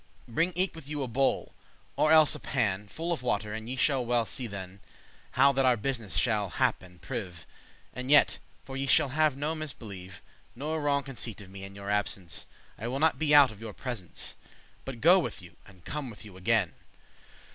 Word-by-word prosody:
Bring 165 +10 +1
eke 185 +2 +1
with 155 -3 -10
you 150 -2 -2
a - - -3
bowl, 130 +3 0 0.4
or 155 - +3
else 155 -1 +7
a 150 - -3
pan, 105 -4 -1
Full 165 - -4
of 155 - -4
water, 105 -4 -1
and 110 +1 -6
ye 130 - -2
shall 135 -1 +2
well 120 -1 +1
see 125 +2 -3
than* 100 -3 -6
*then 95 +2 -18 0.5
How 140 +2 +6
that 135 0 +1
our 125 -2 +4
business 115 -3 -3
shall 105 -5 +1
*hap - - +1
and 90 -1 -15
preve* 90 +3 -5
*succeed* 85 - -15 0.5
And 125 +1 -5
yet, 145 0 +5 0.2
for 135 - -8
ye 135 +1 -2
shall 135 - +4
have 150 0 +2
no 150 +3 -1
misbelieve* 105 - -7
*mistrust 105 - -31
Nor 155 +5 -2
wrong 140 -1 +1
conceit 120 -5 -5
of 95 -2 -13
me, 95 0 -9
in 95 0 -9
your 100 0 -5
absence, 100 -4 -1 0.3
I 115 - -3
wille 130 +3 -2
not 160 +2 +3
be 150 -2 +4
out 140 -4 +8
of 110 0 -13
your 110 -2 -6
presence, 115 -8 -5 0.5
But 130 -4 -7
go 180 +5 +7
with 175 - -3
you, 90 -1 -13
and 95 -4 -18
come 145 -3 -4
with 110 -1 -10
you 100 -3 -12
again." 95 0 +1
125 Hz, 215 wpm, -29 LUFS, 100-145 Hz, 0.5 s, out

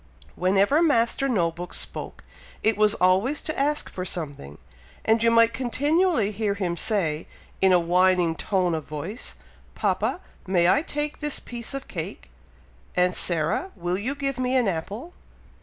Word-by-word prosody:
Whenever 200 - +3
Master 275 -3 +2
No 175 -9 +2
book 175 +2 -7
spoke, - - -5 0.4
it 220 0 +3
was 210 +1 +3
always 190 +11 +2
to 310 - -1
ask 295 +2 +1
for 185 - -6
something, 145 - -4 0.5
and 225 0 +3
you 230 - +4
might 230 0 +5
continually 285 - +1
hear 205 -1 -1
him 180 -3 -2
say, 170 -7 -1 0.3
in 190 0 +5
a 180 - +6
whining 180 0 +3
tone 185 -1 0
of 155 -2 -3
voice, 165 +10 -5 0.4
"Papa! - - 0 0.3
may 175 -2 +3
I 275 +10 +4
take 295 -1 -3
this 295 -2 -1
piece 240 +2 -6
of 275 - -6
cake? - - -7 0.6
Aunt 180 0 +3
Sarah! 170 - +1
will 175 0 -2
you 255 +7 -2
give 275 -2 -2
me 255 0 0
an 250 -4 +3
apple? 200 - -4
205 Hz, 155 wpm, -25 LUFS, 180-260 Hz, 0.6 s, a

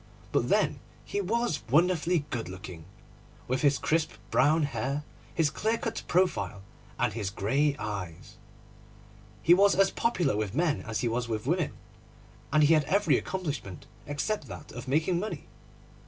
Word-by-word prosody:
But - - +1
then - - +2 0.3
he 205 - -2
was 230 -2 0
wonderfully 170 +1 +3
good 115 -8 -3
looking, 90 -3 -9 0.6
with 130 +1 0
his 140 -1 +4
crisp 160 0 0 0.2
brown 155 +3 +4
hair, 140 +2 -2 0.3
his 160 -4 +2
clear 220 +8 0
cut 225 0 -3
profile, 100 - +1 0.3
and - - +1
his 105 -3 -2
grey 135 +10 +1
eyes. 90 -6 -6 1.1
He 170 - +7
was 200 +2 +5
as 195 0 +4
popular 185 - +1
with 105 0 -2
men 160 -1 +1
as 110 -1 -2
he 120 - +1
was 120 +1 -1
with 110 -1 -2
women 170 +2 0 0.8
and 155 +1 +5
he 150 +2 +6
had 155 -2 +3
every 200 +7 +3
accomplishment 145 - -4 0.2
except 145 +3 -2
that - - -9
of 125 +2 -8
making 160 +6 +2
money. 180 -7 -5
145 Hz, 155 wpm, -29 LUFS, 115-180 Hz, 1.1 s, He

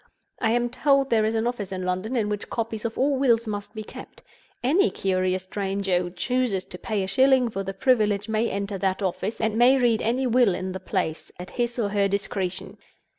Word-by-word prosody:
I 225 - +1
am 240 0 0
told 275 +1 +2
there 220 -2 +3
is 220 +1 0
an 225 +1 0
office 230 -6 -3
in 185 -1 -4
London 185 +7 -2
in 220 -4 +1
which 210 -1 -4
copies 225 -2 -3
of 225 - -3
all 275 +1 +2
wills 235 -4 +3
must 205 +1 -5
be 215 - -5
kept. - - -12 0.4
Any 335 +11 +3
curious 185 -1 0
stranger 195 -1 -1
who 175 0 -3
chooses 200 +1 -1
to 180 - -8
pay 210 -3 -2
a - - -3
shilling 260 +3 +4
for 195 - -3
the 195 0 -5
privilege 210 -3 +2
may 220 +1 0
enter 200 0 -3
that 190 +1 0
office, 195 +3 -2
and 220 0 0
may 255 +3 +6
read 240 -4 +2
any 250 +4 0
will 240 -6 +3
in 185 0 -4
the 190 - -5
place 180 -4 -3
at 180 - -8
his 240 -1 -2
or 215 -4 0
her 200 -1 +2
discretion. 195 -2 -3
215 Hz, 215 wpm, -25 LUFS, 195-240 Hz, 0.4 s, may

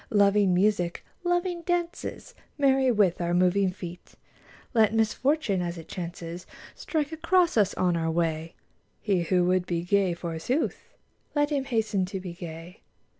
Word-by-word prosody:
Loving 205 -2 +4
music, 180 -3 +1 0.2
loving 350 0 0
dances. 345 0 -3 0.2
Merry 270 -2 +3
with 200 -6 +2
our 175 0 0
moving 185 +2 +3
feet! 180 -1 -9 0.6
Let 220 -2 +4
misfortune 225 - +1
as 175 0 -3
it 165 - -10
chances 170 -1 -6 0.3
Strike 310 -2 -2
across 345 +2 +2
us 205 -3 +3
on 180 -2 +1
our 165 -1 0
way: 165 -1 -1 0.4
He 195 -4 +1
who 175 +1 +2
would 180 0 +1
be 170 -1 -1
gay, 190 -1 +2
forsooth, 170 - -3 0.4
Let 290 0 +2
him 275 -2 0
hasten 220 -6 0
to 190 +1 -5
be 180 -2 -7
gay. 170 +1 -9
195 Hz, 145 wpm, -27 LUFS, 175-260 Hz, 0.6 s, Loving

